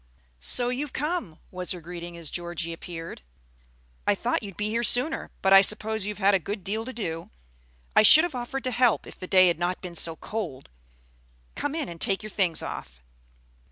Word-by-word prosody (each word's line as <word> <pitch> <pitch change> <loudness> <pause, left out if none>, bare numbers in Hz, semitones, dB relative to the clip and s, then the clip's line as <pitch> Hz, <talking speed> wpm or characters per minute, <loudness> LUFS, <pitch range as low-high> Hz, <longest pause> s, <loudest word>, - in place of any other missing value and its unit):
"So 240 - +2
you're 265 +4 -2
come!" 290 - -3
was 180 0 -1
her 180 - -7
greeting 170 0 -8
as 165 -3 -5
Georgie 170 -1 -4
appeared. 165 0 -8 0.9
"I - - +4
thought - - -1
you'd 200 -4 -9
be 210 - -1
here 230 +2 0
sooner; 250 +7 +2
but 195 0 +5
I 195 - +10
suppose 215 +1 +1
you've 210 - -4
had 200 0 +3
a 195 - +4
good 200 +3 -5
deal 220 +3 -2
to 260 - -5
do. 165 -9 -5 0.7
I - - +7
should 310 +9 +9
have 350 -3 -2
offered 250 +2 -4
to 255 - -1
help 245 -2 +2
if - - -13
the 185 - -7
day 185 -1 +6
had 170 -2 +1
not 175 +1 -1
been 180 -2 -8
so 165 0 +1
cold. 165 -10 -6 0.8
Come 290 +1 -3
in 310 -5 -2
and 170 -1 -9
take 195 +1 +2
your 215 - -7
things 180 -5 +2
off." - - -8
195 Hz, 200 wpm, -26 LUFS, 170-235 Hz, 0.9 s, I